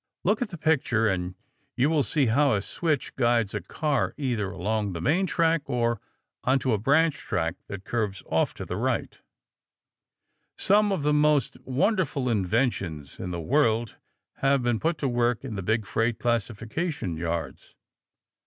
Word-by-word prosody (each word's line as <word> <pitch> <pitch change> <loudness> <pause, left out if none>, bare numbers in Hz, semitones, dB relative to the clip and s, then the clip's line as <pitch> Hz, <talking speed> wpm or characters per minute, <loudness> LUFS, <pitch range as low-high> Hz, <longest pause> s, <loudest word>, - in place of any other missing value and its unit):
Look 210 +5 +2
at 240 - -1
the 170 - -7
picture 130 -8 +2
and 90 -2 -1 0.4
you 130 +3 +3
will 155 -1 +2
see 145 0 +2
how 135 +2 +3
a 100 - -1
switch 155 0 -2
guides 120 -4 +2
a - - -2
car 150 -3 -1
either 120 -9 -1
along 100 +1 -2
the 85 - -4
main 165 - +2
track 165 -2 +2
or 120 -4 0 0.4
onto 130 -1 +2
a 105 - +1
branch 145 +6 +3
track 85 -5 -2
that 95 -1 -7
curves 105 -6 -2
off - - 0
to - - -6
the - - -4
right. - - -1 1.4
Some 205 +1 +4
of 185 -7 -1
the 150 0 +2
most 150 -3 +3
wonderful 140 - +1
inventions 95 - -1
in 90 - -4
the 85 -1 -3
world 115 - +1 0.4
have 135 -1 +2
been 120 -2 +1
put 165 +2 0
to 140 - -1
work 120 -1 +1
in 125 - -5
the 100 - -3
big 110 +3 0
freight 115 +5 0
classification 120 - -2
yards. 80 -3 -4
120 Hz, 160 wpm, -26 LUFS, 105-150 Hz, 1.4 s, Some